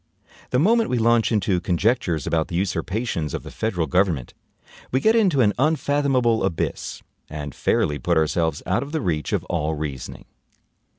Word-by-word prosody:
The 125 - +1
moment 225 - +3
we 125 - +1
launch 115 0 +3
into 100 -4 +1
conjectures 90 - 0
about 80 -1 0
the 85 - -6
usurpations 95 - -2
of - - -5
the - - -9
federal 95 -7 -1
government, 85 -4 0 0.6
we 130 - +2
get 220 +9 +3
into 190 - +3
an 105 -3 +3
unfathomable 140 -5 +2
abyss, 80 - -3 0.3
and 75 -2 -6
fairly 75 0 0
put 85 +6 +1
ourselves 80 0 0
out 95 +5 +1
of 140 +3 -7
the 160 - 0
reach 80 - -1
of - - 0
all 80 -2 -2
reasoning. 75 -4 -6
95 Hz, 165 wpm, -23 LUFS, 80-125 Hz, 0.6 s, moment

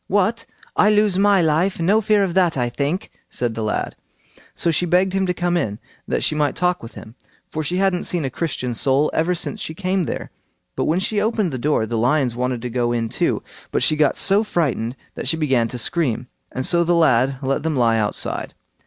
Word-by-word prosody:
"What! 210 +4 0 0.3
I 210 - +4
lose 210 -3 +3
my 200 -2 +4
life! 165 +5 +1
No 200 +6 +3
fear 210 -1 +3
of 185 -3 -1
that, 175 -5 +2
I 120 -1 0
think," 145 - -3 0.2
said 120 -2 -2
the 110 - -4
lad. 105 -1 -2 0.6
So 170 - +1
she 175 +2 0
begged 185 +2 +2
him 195 -1 0
to 180 - +1
come 175 0 0
in, 105 -12 -1 0.3
that - - -1
she - - +1
might 150 -3 0
talk 180 0 0
with 115 - -11
him, 110 - -11 0.4
for 155 - -2
she 165 +4 -2
hadn't 190 -2 +1
seen 170 -5 -1
a 135 - -3
Christian 125 -5 -3
soul 135 +5 +2
ever 175 +3 +1
since 210 +5 -2
she 160 - -5
came 185 -1 -1
there. - - -5 0.4
But - - -1
when 160 - +1
she 205 +2 0
opened 215 -4 0
the 130 - -4
door 140 -4 +1
the 115 0 -2
lions 125 0 +1
wanted 125 -1 -2
to 125 - -3
go 120 -1 0
in 115 -1 -1
too, - - -1 0.3
but - - 0
she 155 - +3
got 150 -2 +2
so 200 +2 +4
frightened 135 - -1 0.2
that - - -6
she 160 - +1
began 135 -7 +1
to 125 - -6
scream, 125 -2 -1 0.3
and 130 - -1
so 170 -1 +4
the 170 +1 +2
lad 135 -5 +3
let 135 +1 0
them 160 -1 -1
lie 115 -3 +3
outside. 105 -1 -1
160 Hz, 225 wpm, -21 LUFS, 125-185 Hz, 0.6 s, I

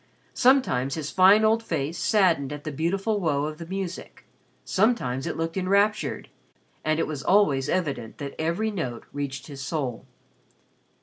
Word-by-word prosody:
Sometimes 245 - +3
his 155 -2 -4
fine 195 +4 +6
old 225 +1 +3
face 160 -5 -3
saddened 170 - +2
at 145 0 -6
the 155 - -4
beautiful 195 +8 -1
woe 150 -6 0
of 155 0 -6
the 165 - -7
music, 190 -1 -6 0.4
sometimes 185 - +1
it - - -3
looked 165 +2 -3
enraptured, 200 +3 +1 0.6
and 155 0 +1
it - - +1
was 150 -3 -5
always 165 -7 +3
evident 140 -11 -2
that 140 -1 -6
every 170 +8 0
note 130 - -4
reached 135 -2 -4
his 140 -2 -9
soul. 135 -4 -3
165 Hz, 150 wpm, -25 LUFS, 140-195 Hz, 0.6 s, fine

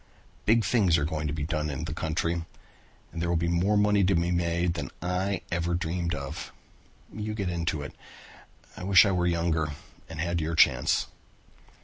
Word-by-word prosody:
Big 115 0 +4
things 95 -6 +3
are 75 - 0
going 80 -1 -2
to - - -2
be 75 -2 -3
done 75 0 -2
in 75 +2 -4
the 80 -2 -4
country 85 +2 -1 0.7
and 85 - -5
there 85 - 0
will 85 - +1
be 85 +1 0
more 90 +5 +2
money 105 -1 +3
to 95 +1 +3
be 85 +1 +1
made 85 0 +1
than 85 - -4
I 90 +2 -1
ever 85 0 0
dreamed 85 0 -2
of. 70 -2 -6 0.6
You 110 0 -4
get 100 -4 -2
into 85 -3 -2
it. - - -8 0.8
I - - -8
wish 95 +1 +7
I 100 - +2
were 90 -1 +1
younger 85 -3 0 0.4
and 80 -2 -8
had 85 0 -1
your 80 +1 -2
chance." - - +4
85 Hz, 190 wpm, -27 LUFS, 80-90 Hz, 0.8 s, wish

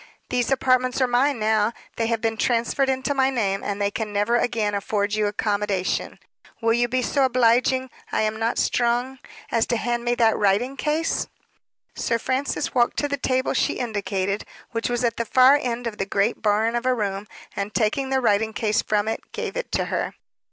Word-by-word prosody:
"These 245 -1 0
apartments 255 -1 +2
are 260 - +4
mine 255 +3 +2
now; 220 0 +1 0.2
they 230 - 0
have 230 -1 -1
been 225 0 0
transferred 240 +4 +1
into 265 +2 0
my 265 -1 +2
name, 200 -7 -1
and 205 0 -3
they 200 0 0
can 215 0 -4
never 205 +3 +1
again 225 -4 0
afford 205 0 -1
you 215 -1 +1
accommodation. 205 -2 -1 0.4
Will 225 -1 +2
you 240 +1 +2
be 255 +1 0
so 275 +3 +1
obliging 255 +1 +2 0.2
I - - +1
am 215 0 -1
not 225 +1 0
strong 245 +2 0 0.3
as 230 -1 +2
to 235 - 0
hand 240 +2 -1
me 240 0 +1
that 225 -2 +3
writing 210 +7 +1
case?" 305 +4 -1 0.7
Sir 230 - 0
Francis 260 +4 -2
walked 240 -2 +2
to 290 - +1
the 285 - -1
table 260 -1 0
she - - +1
indicated, 200 -4 -2 0.3
which 230 +1 -2
was 240 0 -1
at 230 -2 0
the 235 - 0
far 255 +4 +6
end 240 -1 -3
of 225 -3 -4
the 195 - -1
great 200 +3 0
barn 220 +2 +2
of 240 +1 -1
a 255 - +3
room, 200 -2 -3 0.3
and 200 +1 -3
taking 240 +5 0
the 265 0 +1
writing 220 -1 +2
case 215 -1 +1
from 210 0 0
it, 225 - -2
gave - - -4
it - - -4
to - - +1
her. - - -2
230 Hz, 200 wpm, -23 LUFS, 210-255 Hz, 0.7 s, far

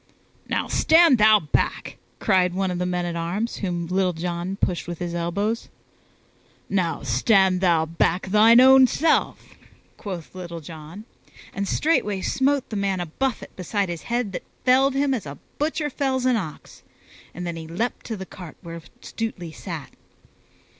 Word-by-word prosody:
"Now - - -1
stand 320 -6 +5
thou 215 0 +7
back!" 150 - -2 0.2
cried 180 -3 +2
one 190 -1 0
of 175 - -3
the 180 - -1
men 180 -1 -1
at 170 -1 -3
arms 180 +8 -2
whom 175 -3 -3
Little 185 +1 0
John 175 +2 -3
pushed 180 -4 -1
with 175 -1 -5
his 175 0 -4
elbows. 200 +7 -2 1.0
"Now 180 -4 -1
stand 185 - +3
thou 170 -4 +3
back 165 +2 0
thine 220 +4 +6
own 265 0 +8
self," 315 +5 +1 0.5
quoth 185 -6 -7
Little 175 -2 -7
John, 160 +6 -10 0.5
and 200 0 -3
straightway 210 -11 +1
smote 275 +5 0
the - - -3
man 200 -2 0
a 175 - -2
buffet 255 +11 -3
beside 195 +1 -2
his 170 -2 -5
head 235 -3 -1
that - - -5 0.2
felled 265 +1 +4
him 275 0 +2
as 215 - -3
a 140 - -8 0.2
butcher 300 0 -1
fells 260 -2 -1
an 255 -1 +3
ox, 180 -9 -6 0.5
and 180 +1 -7
then 170 -1 -4
he 160 -1 -7
leaped 205 +10 -3
to 225 - -4
the 190 - -7
cart 180 -3 -11
where 170 -1 -8 0.2
Stutely 190 -7 -5
sat. 160 -4 -7
190 Hz, 165 wpm, -23 LUFS, 170-230 Hz, 1.0 s, own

